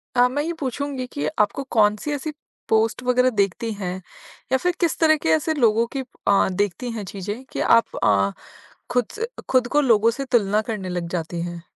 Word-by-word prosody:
अ, 245 0 +6
मैं 270 +4 -2
ये 340 +2 -2
पूछूँगी 270 0 -3
कि 285 +3 -4
आपको 210 +6 +1
कौन-सी 215 +5 +2
ऐसी 290 +2 -3 0.4
पोस्ट 225 +3 +2
वग़ैरह 250 0 +3
देखती 220 +1 0
हैं 185 -3 -4 0.6
या 265 - +4
फिर 360 +6 0
किस 340 -3 +1
तरह 315 -1 +5
के - - +3
ऐसे 315 +1 0
लोगों 230 -5 +3
की 270 - 0 0.3
अ, 200 -1 +4
देखती 205 +6 -2
हैं 220 -3 -5
चीज़ें 205 +6 -6
कि - - -4
आप 230 0 +3
अ, 100 -1 +3 0.6
खुद 245 -2 +1
स 460 - -1 0.2
खुद 255 -2 +3
को - - +7
लोगों 230 -5 +4
से 270 +4 -4
तुलना 215 -5 +2
करने 210 -4 -4
लग 175 -1 -3
जाती 170 -1 -3
हैं। 175 -1 -6
230 Hz, 195 wpm, -23 LUFS, 200-265 Hz, 0.6 s, को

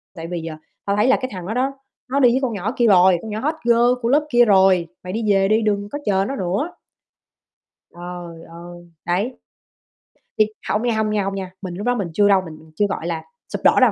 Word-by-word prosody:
Tại 165 0 -7
vì 175 -1 -4
giờ 160 -1 -6 0.3
tao 200 0 0
thấy 210 +4 +2
là 265 - +5
cái 255 - -4
thằng 180 -2 -6
đó 220 - -2
đó, 260 +3 0 0.4
nó 275 +2 +1
đi 250 -3 +6
với 260 - +2
con 245 -4 -1
nhỏ 205 +3 -2
kia 240 -1 +3
rồi, 185 -2 +6
con 220 - -7
nhỏ 215 - -3
hot 305 +5 -1
girl 240 +1 +4
của 230 - 0
lớp 300 +2 +2
kia 240 0 +6
rồi, 190 -4 +4 0.2
mày 185 +1 -6
đi 225 +1 -2
về 195 0 +3
đi 215 +2 +3
đừng 205 -1 0
có 290 - -4
chờ 195 -1 +2
nó 275 - -3
nữa." 200 - -2 1.2
Trời 175 -1 -8
ơi, 175 0 -12
đấy. 200 +9 -1 1.0
Thì 215 - +6 0.2
hông 210 +3 0
nha, 235 -2 +1
hông 215 -1 +1
nha, 210 -2 0
hông 195 0 -3
nha, 190 -1 -5
mình 185 -2 -6
lúc 205 +5 -5
đó 245 - +2
mình 200 -6 -2
chưa 205 +2 +4
đâu, 195 -2 +4
mình 155 0 -12
chưa, 205 - +2
gọi 170 -3 -4
là, 165 -2 -2 0.3
sụp - - -3
đổ - - +5
đâu, - - +6
200 Hz, 245 wpm, -21 LUFS, 175-235 Hz, 1.2 s, đi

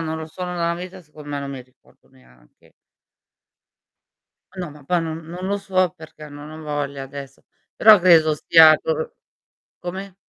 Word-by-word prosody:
non 160 -1 -3
lo 160 - -6
suono 180 +2 -6
da 170 - -1
una - - -2
vita, 185 0 -9
secondo 150 -1 -14
me 145 -1 -3
non 140 0 -5
mi 135 -2 -7
ricordo 130 0 -29
neanche. 60 -1 -25 1.8
Ma 180 -1 -4
no, 150 - -9
ma 145 -1 -15
poi 175 +4 +1
non 160 -1 -4
non 175 +3 -7
lo 200 +1 -1
so 185 -3 0
perché, 155 -2 -12
non 145 +1 -11
ho 155 0 -10
voglia 145 -2 -4
adesso, 140 0 -10 0.3
però 215 -3 +7
credo 165 -3 +5
stia 155 +1 +7
cor 160 0 -3 0.6
come? 190 +2 -7
160 Hz, 175 wpm, -21 LUFS, 145-180 Hz, 1.8 s, però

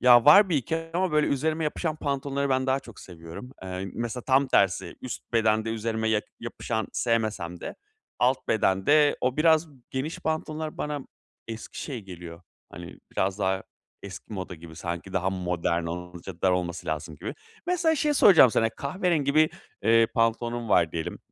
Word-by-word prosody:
ya 120 -1 +7
var 190 +7 +8
1-2 160 0 0 0.2
ama 180 -2 +1
böyle 150 0 +3
üzerime 155 +3 0
yapışan 155 +1 -2
pantolonları 140 -1 -2
ben 130 0 +1
daha 135 +1 +1
çok 115 -4 -13
seviyorum, 85 +7 -10
eee, 95 +1 -5
mesela 120 +1 -3
tam 135 +1 +3
tersi 100 -7 +1
üst 130 - -7
bedende 110 -1 +2
üzerime 110 0 -1
ya 110 -1 +2 0.2
yapışan 115 -2 -3
sevmesem 110 -7 -1
de - - -6 0.4
alt 125 +2 +1
bedende 110 +9 +3
o 125 +2 0
biraz 160 0 +4 0.2
geniş 135 +5 -3
pantolonlar 155 0 -3
bana 150 -1 -2 0.5
eski 110 -1 -7
şey 130 -6 -5
geliyor, 85 -2 -10 0.3
hani 85 +1 -9
biraz 95 +1 0
daha 95 -1 0 0.4
eski 100 +2 -9
moda 95 -2 -5
gibi, 80 0 -12
sanki 85 +2 -5
daha 95 +1 0
modern 90 -2 -1
olunca 90 +1 -7
dar 95 - +4
olması 90 -1 -2
lazım 80 0 -4
gibi. - - -6 0.3
Mesela 340 -2 +2
şeyi 300 0 +1
soracağım 180 - +7
sana, 115 +1 +2
kahverengi 145 - -1
bir, 155 0 +5 0.3
eee, 115 0 +5
pantolonum 115 0 0
var 85 -5 +3
diyelim. 80 -2 -4
115 Hz, 160 wpm, -26 LUFS, 95-145 Hz, 0.5 s, var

